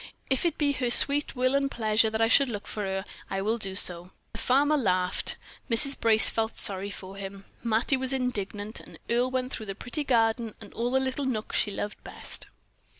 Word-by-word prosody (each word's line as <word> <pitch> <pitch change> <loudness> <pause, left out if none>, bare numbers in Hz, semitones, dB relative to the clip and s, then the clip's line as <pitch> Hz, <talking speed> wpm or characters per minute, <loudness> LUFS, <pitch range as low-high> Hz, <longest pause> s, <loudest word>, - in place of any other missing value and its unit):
"If 265 - 0
it 330 - -4
be 290 -2 +1
her 255 -3 -2
sweet 280 +4 +7
will 255 +1 +1
and 275 0 +1
pleasure 220 -2 +1
that 220 +1 -3
I 225 - +4
should 275 +3 +3
look 210 -3 -6
for 210 - -5
her, 190 0 -3 0.2
I 195 - -3
will 225 +3 -1
do 195 -2 0
so." 175 -2 0 0.2
The 225 - -8
farmer 285 +5 +2
laughed, 185 -8 0 0.3
Mrs. 265 +4 +6
Brace 220 -1 +6
felt 225 0 +1
sorry 195 0 -1
for 195 -1 -10
him, 195 0 -8 0.2
Mattie 230 +4 +1
was 260 0 0
indignant, 215 -5 -3
and - - -14
Earle 245 +2 +1
went 255 0 -3
through 220 - -6
the 195 - -5
pretty 245 +8 -3
garden 230 -3 0
and 205 -3 -13
all 235 +1 -2
the 265 +1 +1
little 265 +1 -3
nooks 220 -5 -2
she - - +1
loved 205 +1 -6
best. - - -6
225 Hz, 210 wpm, -27 LUFS, 205-260 Hz, 0.3 s, sweet